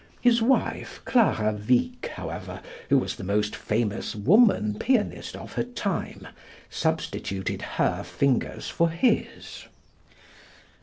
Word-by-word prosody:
His 240 Hz, -1 st, +4 dB
wife, 260 Hz, +4 st, 0 dB
Clara 110 Hz, -, +3 dB
Wieck, 125 Hz, -, 0 dB
however, -, -, -6 dB, 0.3 s
who 140 Hz, -, +5 dB
was 130 Hz, -, -1 dB
the -, -, -7 dB
most 105 Hz, +2 st, 0 dB
famous 110 Hz, -1 st, -2 dB
woman 120 Hz, -, +4 dB
pianist 245 Hz, -4 st, 0 dB
of -, -, -9 dB
her -, -, 0 dB
time, 230 Hz, -6 st, -4 dB, 0.4 s
substituted 95 Hz, -1 st, -2 dB, 0.2 s
her -, -, +1 dB
fingers 140 Hz, -3 st, -1 dB
for 170 Hz, 0 st, +1 dB
his. 170 Hz, +10 st, -1 dB
140 Hz, 110 wpm, -26 LUFS, -, 0.4 s, who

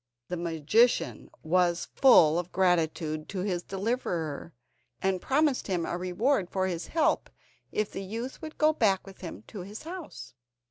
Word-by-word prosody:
The 180 Hz, -, -2 dB
magician 170 Hz, +8 st, +1 dB
was 175 Hz, +1 st, +2 dB
full 175 Hz, -, +6 dB
of 175 Hz, 0 st, -5 dB
gratitude 160 Hz, -4 st, +1 dB
to 190 Hz, -2 st, -3 dB
his 180 Hz, -3 st, -1 dB
deliverer, 180 Hz, -, -3 dB, 0.5 s
and 190 Hz, -1 st, 0 dB
promised 285 Hz, -1 st, +1 dB
him 180 Hz, -4 st, 0 dB
a -, -, -2 dB
reward 185 Hz, +4 st, 0 dB
for 190 Hz, -1 st, 0 dB
his 175 Hz, -2 st, -3 dB
help 325 Hz, -, +1 dB, 0.4 s
if 215 Hz, -1 st, -1 dB
the 195 Hz, -, -5 dB
youth 230 Hz, -, -6 dB
would 315 Hz, -1 st, -8 dB
go 310 Hz, 0 st, +4 dB
back 200 Hz, -9 st, +2 dB
with 195 Hz, -1 st, -13 dB
him 165 Hz, -, -7 dB
to 210 Hz, -, -8 dB
his 200 Hz, +4 st, -8 dB
house. 340 Hz, -, -8 dB
190 Hz, 155 wpm, -28 LUFS, 175-230 Hz, 0.5 s, full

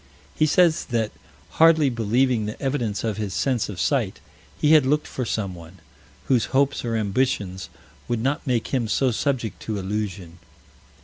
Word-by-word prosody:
He 155 Hz, -, +2 dB
says 170 Hz, +1 st, +3 dB
that, 115 Hz, -4 st, -1 dB, 0.5 s
hardly 160 Hz, -4 st, +6 dB
believing 115 Hz, 0 st, +1 dB
the 105 Hz, -, -6 dB
evidence 125 Hz, -7 st, -2 dB
of 110 Hz, -2 st, -2 dB
his 105 Hz, -3 st, -3 dB
sense 125 Hz, -6 st, 0 dB
of 95 Hz, -4 st, -7 dB
sight, -, -, 0 dB, 0.4 s
he 150 Hz, -, +3 dB
had 155 Hz, -3 st, +7 dB
looked 150 Hz, +3 st, +1 dB
for 130 Hz, -, -4 dB
someone, 95 Hz, -5 st, -5 dB, 0.5 s
whose 125 Hz, -5 st, +2 dB
hopes 140 Hz, 0 st, +1 dB
or 115 Hz, -1 st, -2 dB
ambitions 100 Hz, -3 st, -1 dB, 0.4 s
would 120 Hz, -, 0 dB
not 140 Hz, +5 st, -1 dB
make 120 Hz, -3 st, 0 dB
him 125 Hz, -4 st, 0 dB
so 130 Hz, +4 st, +1 dB
subject 120 Hz, -2 st, -2 dB
to 110 Hz, -2 st, -3 dB
illusion. 95 Hz, -3 st, -4 dB
115 Hz, 160 wpm, -23 LUFS, 105-135 Hz, 0.5 s, had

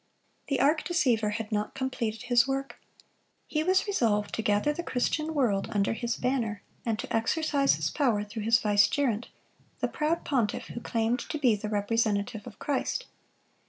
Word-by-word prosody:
The 275 Hz, -, 0 dB
arch 305 Hz, +3 st, +3 dB
deceiver 250 Hz, -11 st, +2 dB
had 215 Hz, +1 st, -4 dB
not 210 Hz, 0 st, -1 dB
completed 240 Hz, -4 st, -2 dB
his 245 Hz, 0 st, +4 dB
work. 275 Hz, 0 st, -3 dB, 0.7 s
He 305 Hz, -, -1 dB
was 370 Hz, +4 st, +2 dB
resolved 225 Hz, -, +1 dB
to -, -, -1 dB
gather 210 Hz, +7 st, +2 dB
the 345 Hz, -, -4 dB
Christian 310 Hz, +2 st, -1 dB
world 220 Hz, -9 st, +1 dB
under 200 Hz, +1 st, +1 dB
his 235 Hz, 0 st, -2 dB
banner, 230 Hz, -6 st, -1 dB, 0.2 s
and 225 Hz, -2 st, -1 dB
to -, -, -3 dB
exercise 275 Hz, +4 st, +2 dB
his -, -, -2 dB
power 240 Hz, -8 st, +1 dB
through 210 Hz, +2 st, -6 dB
his 230 Hz, +1 st, +5 dB
vicegerent, 220 Hz, +2 st, +2 dB, 0.5 s
the -, -, +1 dB
proud 315 Hz, +2 st, -1 dB
pontiff 240 Hz, -8 st, 0 dB
who -, -, -5 dB
claimed 230 Hz, +2 st, 0 dB
to -, -, -2 dB
be 250 Hz, -7 st, +3 dB
the 210 Hz, +1 st, -5 dB
representative 210 Hz, +1 st, 0 dB
of 230 Hz, -, -10 dB
Christ. 295 Hz, -, -1 dB
235 Hz, 165 wpm, -28 LUFS, 215-280 Hz, 0.7 s, his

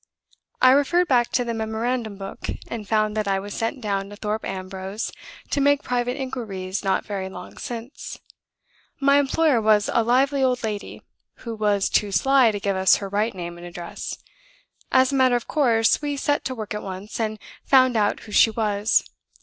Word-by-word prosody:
I 255 Hz, -, +8 dB
referred 335 Hz, +6 st, +3 dB
back 245 Hz, -4 st, +3 dB
to 245 Hz, -, +1 dB
the 235 Hz, -, -2 dB
memorandum 220 Hz, 0 st, -2 dB
book, 195 Hz, 0 st, -7 dB, 0.2 s
and 215 Hz, -3 st, -6 dB
found 215 Hz, -1 st, +1 dB
that 215 Hz, -1 st, -1 dB
I 195 Hz, -1 st, +1 dB
was 200 Hz, +1 st, -7 dB
sent 235 Hz, +4 st, -3 dB
down 200 Hz, -2 st, -2 dB
to 205 Hz, -, -9 dB
Thorpe 215 Hz, +1 st, -3 dB
Ambrose 190 Hz, +2 st, -5 dB, 0.4 s
to 285 Hz, -, +1 dB
make 285 Hz, 0 st, +3 dB
private 245 Hz, +1 st, -1 dB
inquiries 210 Hz, -8 st, -4 dB
not 195 Hz, -1 st, 0 dB
very 195 Hz, -2 st, -4 dB
long 180 Hz, -1 st, -10 dB
since. 240 Hz, +3 st, -7 dB, 0.8 s
My 280 Hz, 0 st, +5 dB
employer 285 Hz, -2 st, +2 dB
was 215 Hz, -1 st, +3 dB
a -, -, +4 dB
lively 270 Hz, +4 st, +2 dB
old 250 Hz, -2 st, +1 dB
lady, 210 Hz, -2 st, -5 dB, 0.4 s
who 230 Hz, -, -4 dB
was 210 Hz, -2 st, +1 dB
too 205 Hz, -1 st, +1 dB
sly 270 Hz, +3 st, +4 dB
to 205 Hz, -2 st, -2 dB
give 200 Hz, -1 st, -1 dB
us 190 Hz, 0 st, +5 dB
her 200 Hz, -1 st, -5 dB
right 210 Hz, +2 st, 0 dB
name 175 Hz, -1 st, -6 dB
and 175 Hz, -, -9 dB
address. 175 Hz, 0 st, -7 dB, 0.7 s
As 260 Hz, +1 st, +4 dB
a -, -, -1 dB
matter 260 Hz, -2 st, +4 dB
of 240 Hz, -, -2 dB
course, 235 Hz, -7 st, +3 dB
we 290 Hz, -1 st, -2 dB
set 290 Hz, +1 st, 0 dB
to 260 Hz, -, -3 dB
work 215 Hz, -3 st, -5 dB
at 210 Hz, -, -4 dB
once, 195 Hz, +3 st, -7 dB
and 215 Hz, -1 st, -1 dB, 0.3 s
found 255 Hz, -2 st, +4 dB
out 210 Hz, -2 st, +1 dB
who 215 Hz, -, -12 dB
she 225 Hz, -, +6 dB
was. 215 Hz, -1 st, +1 dB
220 Hz, 190 wpm, -23 LUFS, 200-255 Hz, 0.8 s, I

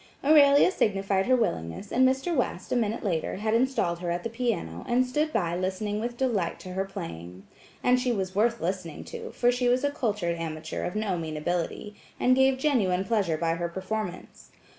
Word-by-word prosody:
Aurelia 290 Hz, +2 st, +6 dB
signified 195 Hz, -, +1 dB
her 255 Hz, -, +5 dB
willingness 195 Hz, -, -2 dB
and 260 Hz, +1 st, +5 dB
Mr. 270 Hz, +6 st, -1 dB
West, 250 Hz, -, -2 dB
a -, -, +2 dB
minute 225 Hz, -2 st, 0 dB
later, 170 Hz, -7 st, -1 dB
had 215 Hz, +3 st, -1 dB
installed 230 Hz, -8 st, +1 dB
her 175 Hz, -1 st, -3 dB
at 175 Hz, +1 st, -2 dB
the 230 Hz, -, -4 dB
piano, 225 Hz, -, -2 dB
and 250 Hz, +2 st, +3 dB
stood 300 Hz, +5 st, 0 dB
by 170 Hz, -, 0 dB
listening 190 Hz, +3 st, -2 dB
with 240 Hz, +2 st, -4 dB
delight 230 Hz, -10 st, 0 dB
to 185 Hz, -, -9 dB
her 190 Hz, +1 st, -1 dB
playing. 95 Hz, -, -8 dB, 0.4 s
And 250 Hz, 0 st, +4 dB
she 250 Hz, -1 st, 0 dB
was 190 Hz, -4 st, -2 dB
worth 230 Hz, +4 st, +2 dB
listening 175 Hz, -2 st, -3 dB
to 465 Hz, -1 st, -7 dB
for 245 Hz, -, +2 dB
she 245 Hz, 0 st, +1 dB
was 250 Hz, +2 st, +2 dB
a 285 Hz, -, +1 dB
cultured 205 Hz, -10 st, -1 dB
amateur 160 Hz, -1 st, -4 dB
of 180 Hz, -, -4 dB
no 205 Hz, -5 st, -1 dB
mean 155 Hz, -2 st, -4 dB
ability, 175 Hz, +5 st, -2 dB, 0.3 s
and 255 Hz, 0 st, +4 dB
gave 265 Hz, 0 st, +4 dB
genuine 205 Hz, -10 st, +1 dB
pleasure 195 Hz, -8 st, +1 dB
by 165 Hz, +1 st, 0 dB
her 170 Hz, +1 st, -2 dB
performance. 190 Hz, +1 st, -5 dB
205 Hz, 195 wpm, -27 LUFS, 175-250 Hz, 0.4 s, Aurelia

